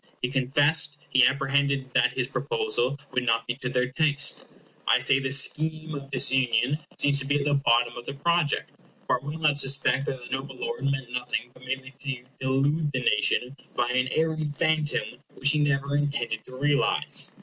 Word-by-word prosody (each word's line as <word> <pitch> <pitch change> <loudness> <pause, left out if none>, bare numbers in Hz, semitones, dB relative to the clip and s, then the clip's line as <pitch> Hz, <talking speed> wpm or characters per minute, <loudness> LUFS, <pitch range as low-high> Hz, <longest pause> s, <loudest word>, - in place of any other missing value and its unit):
He 125 - -1
confessed 145 +4 +2
he 130 -1 +6
apprehended 140 0 0
that - - +3
his - - -1
proposal 435 - 0
would 125 - 0
not 115 -1 +1
be 120 - -2
to 125 -2 -4
their 125 0 0
taste. 145 -1 +1 0.4
I - - +5
say 140 - +4
this 135 0 +4
scheme 155 0 -4
of 140 -1 -7
disunion 130 0 +2 0.2
seems 140 -1 +3
to 140 - -2
be 145 +1 +2
at 140 - -2
the 145 - +1
bottom 120 -3 +2
of 120 - -8
the 140 - -5
project; 170 +1 0 0.3
for - - 0
I - - -21
will 150 +2 -4
not 155 -3 +2
suspect 135 -1 +1
that 135 - -2
the 120 - -12
noble 135 0 -4
lord 140 +1 -4
meant 135 -3 -2
nothing 125 -1 -3
but 125 - -19
merely 130 +1 -5
to 135 -3 -5 0.2
delude 140 +4 +1
the 130 - -1
nation 140 -1 +1 0.2
by 120 0 0
an 130 +1 +1
airy 160 -1 0
phantom 155 0 -1 0.2
which 140 +1 +2
he 150 - +1
never 140 -1 0
intended 140 -6 -1
to 130 0 -11
realize. 145 0 +2
140 Hz, 190 wpm, -26 LUFS, 130-145 Hz, 0.4 s, he